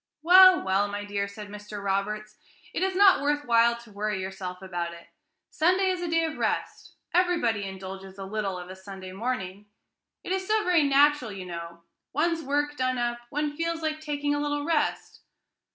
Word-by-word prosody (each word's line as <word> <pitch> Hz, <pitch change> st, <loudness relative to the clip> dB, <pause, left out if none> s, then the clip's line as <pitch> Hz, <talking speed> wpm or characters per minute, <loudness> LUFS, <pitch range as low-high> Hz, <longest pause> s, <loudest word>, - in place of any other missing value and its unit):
"Well, 370 Hz, +2 st, +8 dB
well, 195 Hz, +2 st, +1 dB
my 205 Hz, 0 st, -5 dB
dear," 200 Hz, -1 st, -2 dB
said 205 Hz, +1 st, -9 dB
Mr. 210 Hz, 0 st, -8 dB
Roberts, 210 Hz, +2 st, -2 dB, 0.4 s
"it -, -, -2 dB
is 380 Hz, 0 st, 0 dB
not 390 Hz, -5 st, +6 dB
worth 290 Hz, +1 st, 0 dB
while 235 Hz, 0 st, +4 dB
to 235 Hz, -2 st, -15 dB
worry 205 Hz, -1 st, -2 dB
yourself 185 Hz, -1 st, -6 dB
about 175 Hz, -2 st, -4 dB
it; 170 Hz, -, -15 dB, 0.4 s
Sunday 370 Hz, +4 st, +2 dB
is 365 Hz, -1 st, -3 dB
a 350 Hz, -, -2 dB
day 330 Hz, 0 st, +2 dB
of 315 Hz, -, -5 dB
rest; -, -, -3 dB, 0.2 s
everybody 335 Hz, -, +2 dB
indulges 190 Hz, 0 st, -8 dB
a 195 Hz, -, -6 dB
little 195 Hz, -2 st, -3 dB
of 180 Hz, +1 st, -8 dB
a -, -, -8 dB
Sunday 190 Hz, -1 st, -9 dB
morning, 200 Hz, -2 st, -4 dB, 0.6 s
it -, -, -6 dB
is 380 Hz, 0 st, -1 dB
so 430 Hz, 0 st, +2 dB
very 360 Hz, -4 st, +4 dB
natural, 280 Hz, -3 st, +4 dB
you 190 Hz, -2 st, -7 dB
know; 170 Hz, -1 st, -8 dB, 0.3 s
one's 330 Hz, +3 st, +1 dB
work 290 Hz, +1 st, -1 dB
done 255 Hz, 0 st, 0 dB
up, 240 Hz, 0 st, -1 dB
one 295 Hz, +1 st, -2 dB
feels 330 Hz, +1 st, -2 dB
like 310 Hz, 0 st, -1 dB
taking 290 Hz, -1 st, -2 dB
a 290 Hz, -, 0 dB
little 290 Hz, 0 st, -1 dB
rest." 325 Hz, -2 st, -1 dB
235 Hz, 185 wpm, -27 LUFS, 195-310 Hz, 0.6 s, Well